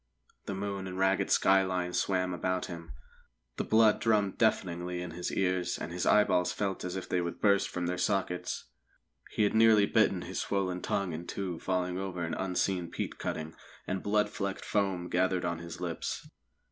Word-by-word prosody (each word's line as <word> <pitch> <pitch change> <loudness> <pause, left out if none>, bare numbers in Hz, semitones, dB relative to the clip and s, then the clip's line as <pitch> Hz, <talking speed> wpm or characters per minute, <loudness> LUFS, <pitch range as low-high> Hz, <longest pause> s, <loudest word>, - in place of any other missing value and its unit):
The 100 - -2
moon 100 -1 -3
and 95 0 -6
ragged 95 0 +2
skyline 95 -2 +3
swam 90 -1 +1
about 95 +1 -1
him; 85 -4 -8 0.7
the - - 0
blood 110 -1 +4
drummed 105 -3 +2
deafeningly 90 -5 +1
in 90 -1 -5
his 90 +2 -4
ears, 90 -2 0
and - - -5
his 90 +1 -2
eyeballs 90 -4 +4
felt 100 -2 -2
as 90 0 -4
if 95 - -4
they 90 - +1
would 85 0 -4
burst 100 -2 +3
from 90 -1 -3
their 90 +1 -2
sockets. 90 -1 -1 0.7
He 110 - +3
had 105 - +2
nearly 110 -2 +6
bitten 100 -4 +2
his 95 - -4
swollen 95 -2 -1
tongue 100 -4 -1
in 85 +2 -6
two 90 -4 -4
falling 90 -1 -1
over 95 -2 -3
an 80 - -2
unseen 90 -1 -1
peat - - -4
cutting, 80 +1 -4 0.3
and 95 0 -2
blood 105 0 +1
flecked 100 -1 -3
foam 95 -4 0
gathered 90 0 +1
on 85 -1 -2
his 85 0 -8
lips. 85 -2 -4
95 Hz, 180 wpm, -31 LUFS, 90-100 Hz, 0.7 s, nearly